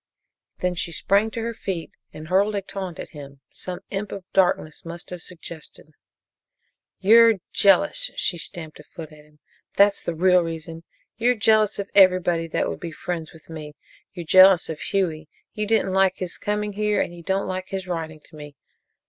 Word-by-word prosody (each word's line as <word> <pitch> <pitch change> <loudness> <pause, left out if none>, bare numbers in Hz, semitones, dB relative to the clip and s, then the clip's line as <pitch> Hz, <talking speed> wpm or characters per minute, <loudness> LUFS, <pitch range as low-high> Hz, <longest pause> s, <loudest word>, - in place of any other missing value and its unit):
Then 180 0 0
she 170 -1 -3
sprang 200 +6 +1
to 230 - -5
her 230 0 -3
feet 190 -6 -5 0.2
and 155 +1 -10
hurled 200 +4 +2
a 200 - -1
taunt 190 -3 -6
at - - -7
him 140 -2 -12
some 180 -1 -6
Imp 200 +1 -4
of 195 - -7
Darkness 175 -5 +1
must 170 +1 -9
have 180 -1 -6
suggested: 165 -3 -10 1.1
"You're 230 +3 +6 0.2
jealous!" 300 - +4
She 175 - -1
stamped 160 -3 -7
a - - -12
foot 160 +1 -11
at 150 -1 -15
him. 150 0 -25 0.4
"That's 200 0 +4
the 170 - -4
real 180 +2 +4
reason. 165 0 -6 0.3
You're 245 +2 +2
jealous 215 -1 +3
of 200 0 -5
everybody 180 -3 +4
that 160 - -1
would - - -5
be 170 - -6
friends 165 -1 -5
with 160 -2 -18
me! 155 -2 -9 0.4
You're 175 -2 -6
jealous 185 +2 +6
of 155 -1 -5
Hughie. 160 -5 -2 0.2
You 210 0 -3
didn't 215 -3 +1
like 190 -1 +3
his 180 -2 -5
coming 210 0 -2
here 210 0 0
and 175 - -2
you 170 - -11
don't 190 +3 -1
like 185 0 -4
his 190 -1 -5
writing 160 -3 -5
to 160 - -18
me! 145 -1 -11
180 Hz, 185 wpm, -23 LUFS, 165-200 Hz, 1.1 s, You're